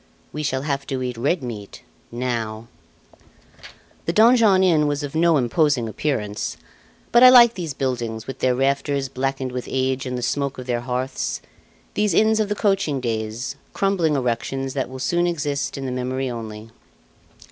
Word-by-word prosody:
"We 150 - -3
Shall 130 -2 -1
Have 140 -2 -2
to 130 -1 -2
Eat 125 -1 -3
Red 140 +7 0
Meat 105 -5 -7 0.3
Now" 115 -2 -3 1.4
The - - +2
Donjon 220 -3 +5
Inn 160 -5 +3
was 145 0 -1
of 145 - -5
no 165 0 +4
imposing 135 -1 +1
appearance; 110 -4 -3 0.5
but 240 - +6
I 255 - +11
like 240 -2 +8
these 165 - -5
buildings 120 -5 -3
with 135 +1 -7
their 130 -1 +2
rafters 140 +1 0
blackened 135 0 -2
with 125 0 -5
age 130 0 -1
and 125 0 -3
the 125 - -4
smoke 140 +2 -1
of 125 - -7
their 120 -1 -1
hearths 125 +2 -3 0.5
these 210 -5 +1
inns 220 0 +4
of 215 -1 0
the 210 - 0
coaching 195 -10 +1
days, 115 +2 -3 0.2
crumbling 185 -6 +1
erections 130 +1 -2
that 135 -3 -2
will 130 - -8
soon 175 +7 +1
exist 145 -5 -2
in 135 - -5
the 130 - -3
memory 130 +1 -2
only. 110 -1 -7
135 Hz, 170 wpm, -22 LUFS, 125-155 Hz, 1.4 s, I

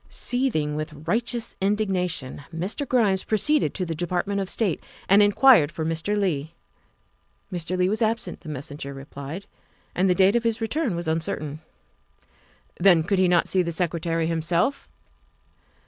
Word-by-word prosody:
Seething 230 - 0
with 155 0 -6
righteous 235 +4 -1
indignation, 185 -9 -1
Mr. 190 - -3
Grimes 210 -7 +2
pro 220 - 0
ceeded 300 +6 +3
to 185 - -2
the 165 - -3
Department 180 +4 -1
of 190 - -4
State 205 -8 0 0.2
and 200 +2 +6
inquired 205 - +6
for 160 +1 -4
Mr. 165 +6 -1
Leigh. 165 -5 -1 1.0
Mr. 175 +1 -2
Leigh 180 0 +2
was 215 +4 -1
absent, 220 -5 -1
the 155 - -9
messenger 140 -1 -6
replied, 140 +6 -8 0.5
and 185 +1 +2
the 180 - +3
date 190 +3 +4
of 235 - +2
his 230 0 0
return 235 - -1
was 170 -1 -4
uncertain. 155 -2 -2 1.2
Then, 175 -3 +5
could 195 +3 0
he 185 - +4
not 175 -1 +3
see 185 - +2
the 170 -1 -2
Secretary 165 -1 -1
himself? 170 - 0
180 Hz, 155 wpm, -24 LUFS, 160-210 Hz, 1.2 s, and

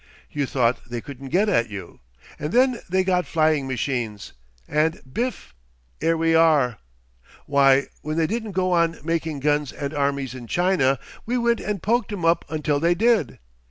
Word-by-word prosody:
You 145 -2 -1
thought 120 -2 0
they 120 0 -3
couldn't 135 +2 -9
get 195 +8 +2
at 120 - +2
you. 100 -4 -9 0.4
And 150 - -3
then 255 -1 +3
they 185 +1 +2
got 180 -3 +1
flying 155 -3 +1
machines. 120 -5 -3 0.3
And 155 +2 +1
bif! 245 - -3 0.5
'ere 165 0 +2
we 165 0 +2
are. 150 -8 +4 0.7
Why, 140 -1 +4 0.2
when 155 +1 -4
they 165 - +3
didn't 220 +2 -3
go 185 0 0
on 170 -1 +2
making 160 -3 -2
guns 145 0 +1
and 140 +1 -5
armies 140 -2 -1
in 125 -2 -9
China, 160 - +2 0.3
we 245 +2 0
went 235 -1 +2
and 205 -4 -4
poked 230 0 +1
'em 190 -5 -3
up 165 0 +3
until 150 -2 0
they 170 +3 +2
did. 220 - +2
155 Hz, 170 wpm, -23 LUFS, 135-185 Hz, 0.7 s, are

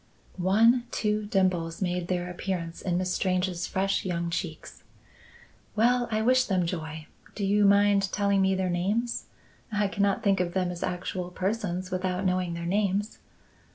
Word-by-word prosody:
One 225 +7 +4
two 210 -2 -1
dimples 185 -5 0
made 180 -2 -1
their 180 -1 -1
appearance 175 -2 -4
in 175 -2 0
Miss 180 0 -1
Strange's 185 -2 0
fresh, 195 +1 0
young 170 -2 -2
cheeks. 165 -2 -5 0.9
"Well! 240 +2 +3
I 220 -1 0
wish 255 +2 +4
them 185 -3 +1
joy. 160 -3 -5 0.3
Do 200 - -2
you 205 +1 +3
mind 200 -1 +4
telling 200 -1 +2
me 190 0 +3
their 185 -1 0
names? 205 +7 -1 0.5
I 210 -1 +1
cannot 200 0 0
think 195 -2 +3
of 175 0 -1
them 180 -1 +1
as 175 - -7
actual 180 0 -3
persons 185 -1 -2
without 185 +1 -1
knowing 180 -2 0
their 170 0 -5
names." 200 +3 0
185 Hz, 155 wpm, -27 LUFS, 180-205 Hz, 0.9 s, One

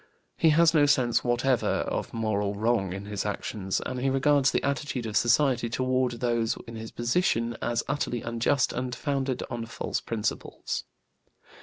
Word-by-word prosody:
He 165 - +4
has 165 +2 +5
no 145 -3 +5
sense 125 -4 +3
whatever 120 +1 +1
of - - -1
moral 105 -3 -1
wrong 110 -3 +1
in 95 +2 -6
his 105 -1 -3
actions, 100 -2 -2
and 130 - -3
he 135 +2 +1
regards 135 0 +3
the - - 0
attitude 140 -3 -2
of 110 -2 -4
society 120 0 +3
toward 130 +1 0
those 115 -1 0
in 115 - -8
his 110 0 -6
position 120 -2 0
as 120 -1 0
utterly 135 -4 -2
unjust 120 +4 +1
and 125 0 -3
founded 135 -1 -2
on 115 -2 -4
false 115 - -3
principles. 110 -2 -3
120 Hz, 160 wpm, -27 LUFS, 115-135 Hz, -, has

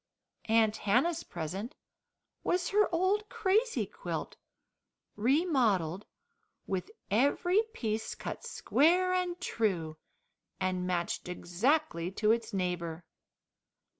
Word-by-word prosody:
Aunt 220 -1 +3
Hannah's 305 +11 +2
present 180 - -5 0.7
was 355 0 +1
her 420 +1 +3
old 385 +5 +1
crazy 435 +5 +1
quilt, - - -5 0.8
remodelled, 220 - +2 0.6
with 185 -2 -3 0.2
every 285 - +3
piece 220 -1 -2
cut - - -6
square 360 +5 +2
and 360 -1 -1
true, 170 -8 -1 0.6
and 185 -1 -1
matched 175 0 -2
exactly 180 - 0
to 215 +2 +2
its 230 0 0
neighbour. 175 -4 -2
225 Hz, 95 wpm, -31 LUFS, -, 0.8 s, Aunt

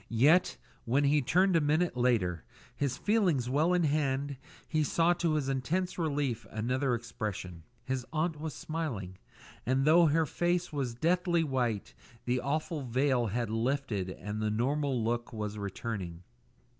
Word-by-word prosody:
Yet, 145 +11 +4 0.3
when 130 +5 +2
he 145 +1 +4
turned 185 +8 +3
a 165 - +4
minute 155 +3 +1
later, 110 -10 +1 0.3
his 140 -3 -1
feelings 180 - +1
well 155 +6 +3
in 180 -1 +3
hand, 140 -2 0 0.3
he 155 -1 +1
saw 165 +4 +3
to 170 -2 0
his 145 -3 0
intense 155 +8 -1
relief 140 -7 -1
another 125 +4 0
expression; 105 -7 -5 0.2
his 130 0 -2
aunt 155 -1 -1
was 160 -1 -4
smiling, 115 - -4 0.4
and 130 +2 +1
though 165 +1 +6
the 160 +2 +3
face 175 +2 -1
was 130 -5 -2
deathly 170 +3 +2
white, 125 -8 -1 0.3
the 125 +1 +1
awful 155 +4 -2
veil 130 -1 +1
had 115 +1 -2
lifted 115 -4 -1
and 105 +3 -5
the 110 - +1
normal 130 +3 0
look 120 +1 -1
was 105 -2 -4
returning. 100 -4 -5
135 Hz, 150 wpm, -31 LUFS, 115-155 Hz, 0.4 s, though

